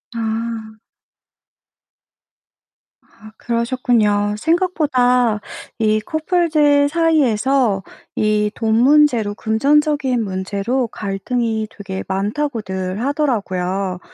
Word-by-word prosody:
아. 225 -1 -4 2.2
아 215 -1 -17
그러셨군요. 230 -4 0
생각보다 255 - +2 0.4
이 215 -1 +2
커플들 310 - +2
사이에서 270 - +2 0.3
이 210 -1 +1
돈 225 -2 0
문제로 250 -4 +4
금전적인 275 +3 +1
문제로 200 +6 -2
갈등이 220 +2 -3
되게 190 -2 -6
많다고들 195 -2 -3
하더라고요. 195 -10 -1
230 Hz, 190 characters per minute, -19 LUFS, 210-280 Hz, 2.2 s, 문제로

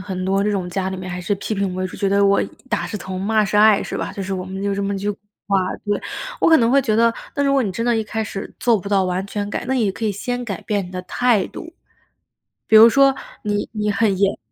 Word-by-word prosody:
很 185 -1 -4
多 195 +1 +1
这 210 - 0
种 185 -3 -2
家 190 +1 -2
里 190 - -4
面 185 0 -6
还 180 0 -4
是 200 +3 -1
批 200 - -5
评 195 -3 -1
为 185 0 -2
主， 185 - -6
觉 200 -2 0
得 200 0 +3
我 200 0 +4 0.3
“打 - - 0
是 210 - -5
疼 185 -1 -6
骂 215 +1 +2
是 205 - -1
爱” 210 -1 +6
是 - - -5
吧？ - - -4
就 195 - -5
是 195 +1 -4
我 185 -1 -3
们 190 +1 -6
就 200 0 0
这 200 - -2
么 200 0 -1
一 - - -3
句 205 +1 -1
古 200 - -7 0.3
话。 195 -1 +3 0.3
对， 205 0 -1 0.4
我 - - +4
可 320 - +7
能 230 0 +3
会 275 +1 +5
觉 225 -5 0
得， 230 +1 +4 0.2
那 285 - 0
如 275 - +2
果 275 - +3
你 200 -6 -1
真 230 +5 -3
的 240 -1 +2
一 220 - -1
开 220 +1 -3
始 195 -2 -6
做 235 -3 +3
不 200 - -7
到 200 -1 +3
完 185 +1 -2
全 205 0 -4
改， - - -3
那 265 - 0
也 225 -6 +1
可 220 +4 -6
以 210 - +1
先 245 +4 -3
改 200 -6 -5
变 200 -3 -2
你 180 - -12
的 180 - -5
态 230 +1 +1
度。 335 - -9 1.0
比 220 - +6
如 225 +2 +10
说 275 +2 +4 0.3
你 205 -1 -2
你 210 -1 -1
很 200 -1 +1
严 200 +1 +1
205 Hz, 310 characters per minute, -20 LUFS, 190-220 Hz, 1.0 s, 如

